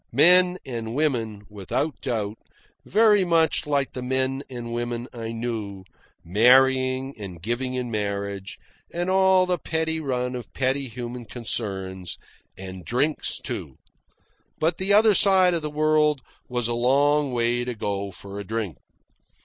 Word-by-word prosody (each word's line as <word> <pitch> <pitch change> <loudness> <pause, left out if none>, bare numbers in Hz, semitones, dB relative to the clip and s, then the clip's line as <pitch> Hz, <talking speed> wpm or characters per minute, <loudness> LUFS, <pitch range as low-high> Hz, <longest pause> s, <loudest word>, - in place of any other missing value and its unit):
Men 180 +6 +6
and 115 -2 -5
women, 115 -9 -1
without 105 - -3
doubt, 110 -4 -3 0.5
very 210 -1 +4
much 165 -3 +2
like 140 -2 0
the 125 - -5
men 130 +1 -1
and 120 -2 -6
women 120 0 -3
I 115 -2 -5
knew; 110 -5 -4 0.4
marrying 130 +6 +4
and 95 -4 -7
giving 120 +7 -2
in 125 -2 -3
marriage 100 -2 -3 0.3
and 175 +2 -2
all 190 -1 +5
the 180 -2 -1
petty 160 0 -1
run 125 -4 -2
of 125 - -7
petty 135 +1 0
human 120 0 -7
concerns; 95 -6 -4 0.4
and 95 -1 -8
drinks, 140 - -1
too. - - -6 0.8
But 160 +2 +1
the 190 +1 0
other 215 +1 +6
side 190 -2 +5
of 170 - 0
the 150 - -3
world 150 -1 +2 0.3
was 120 -2 -1
a 120 - -1
long 140 +4 +2
way 120 0 0
to 125 -1 -4
go 100 -2 -3
for 100 +2 -9
a - - -5
drink. 105 -4 -4
125 Hz, 145 wpm, -24 LUFS, 110-150 Hz, 0.8 s, Men